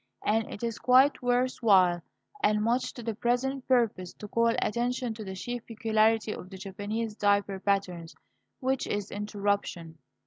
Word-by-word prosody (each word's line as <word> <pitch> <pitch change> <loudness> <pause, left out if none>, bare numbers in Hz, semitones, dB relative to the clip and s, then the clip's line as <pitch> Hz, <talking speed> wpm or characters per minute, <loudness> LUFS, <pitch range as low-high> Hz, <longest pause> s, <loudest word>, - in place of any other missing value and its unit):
And 220 +1 +1
it 205 - -8
is 230 -2 -2
quite 260 +3 +5
worth 245 +1 +1
while, 185 -6 +5 0.4
and 210 0 +2
much 240 +3 +1
to 240 - -9
the 225 0 -2
present 245 +4 -1
purpose, 230 -8 +1
to 210 - -9
call 230 +3 +2
attention 240 +1 0
to 220 0 -8
the 190 -2 -6
chief 240 +5 -5
peculiarity 220 -1 +2
of 185 - -9
the 190 - -9
Japanese 205 +3 -4
diaper 200 -2 +1
patterns, 185 -4 -1 0.4
which 265 0 -1
is 205 -1 -3
interruption. 200 -5 -2
215 Hz, 160 wpm, -28 LUFS, 200-240 Hz, 0.4 s, quite